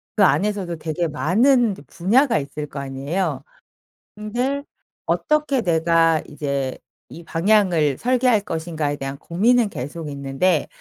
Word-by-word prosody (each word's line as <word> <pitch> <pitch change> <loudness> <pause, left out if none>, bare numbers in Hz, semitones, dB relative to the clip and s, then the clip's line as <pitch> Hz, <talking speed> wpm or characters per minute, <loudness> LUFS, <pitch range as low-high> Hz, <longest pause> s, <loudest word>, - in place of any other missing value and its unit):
그 210 - +4
안에서도 195 -2 +1
되게 160 +2 -2
많은 220 - +3
이제 190 - -8
분야가 235 +8 +2
있을 150 +1 -6
거 140 - -7
아니에요. 140 +2 -3 0.7
근데 245 +7 -2 0.4
'어떻게 300 -4 +1
내가 165 -2 +3
이제 140 -3 -3 0.3
이 170 - -11
방향을 170 -5 +2
설계할 250 -3 +2
것인가.'에 160 -5 -3
대한 135 0 -5
고민은 215 - +2
계속 150 +3 -6
있는데 140 +4 0
170 Hz, 285 characters per minute, -21 LUFS, 150-215 Hz, 0.7 s, 그